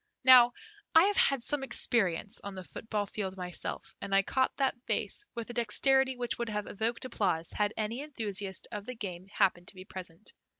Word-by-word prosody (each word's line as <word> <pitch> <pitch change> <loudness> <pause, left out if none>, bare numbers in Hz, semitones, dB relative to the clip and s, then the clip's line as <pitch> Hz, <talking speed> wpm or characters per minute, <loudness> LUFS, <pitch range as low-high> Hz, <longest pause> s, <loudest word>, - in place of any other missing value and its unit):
Now, 250 -2 +8 0.4
I 325 - +9
have 405 +1 +2
had 275 -8 +4
some 290 +2 -1
experience 210 -6 0
on 200 -1 -7
the 185 - -7
football 210 +2 -4
field 195 -2 -5
myself, 180 -1 -3
and 195 - -2
I 195 - +5
caught 260 +5 0
that 270 -2 +1
vase 415 - +1
with 235 0 -5
a - - -9
dexterity 265 +3 +3
which 245 -1 -3
would 235 -1 -2
have 210 -1 -3
evoked 230 +4 -3
applause 185 -9 -1
had 210 -1 0
any 220 +4 -3
enthusiast 205 - -2
of 205 0 -6
the 250 - -5
game 185 -4 -7
happened 180 -2 0
to - - -9
be 185 0 -11
present. 185 -1 -10
215 Hz, 195 wpm, -30 LUFS, 195-250 Hz, 0.4 s, I